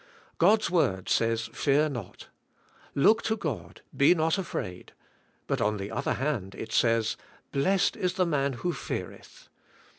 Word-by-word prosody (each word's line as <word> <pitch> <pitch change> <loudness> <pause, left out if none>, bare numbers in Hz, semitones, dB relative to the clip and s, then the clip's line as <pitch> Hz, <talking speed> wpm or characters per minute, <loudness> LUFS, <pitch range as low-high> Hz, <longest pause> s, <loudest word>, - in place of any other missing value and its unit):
God's 210 +3 +4
word 95 - +1
says 115 -1 +1
"Fear 150 +2 +2
not." 120 -9 -7 0.7
Look 215 +11 +5
to 220 0 -1
God, 155 - -5
be 140 +6 +5
not 160 +2 +1
afraid. 90 - -5 0.5
But - - -1
on 105 0 +1
the 100 +1 -5
other 120 - -1
hand 120 -9 -2
it - - -7
says, 115 -2 +2 0.3
"Blessed 185 +7 +2
is 180 -1 -1
the 185 -1 +2
man 140 -4 0
who 170 +9 -2
feareth." - - -7
140 Hz, 145 wpm, -28 LUFS, 115-175 Hz, 0.7 s, Look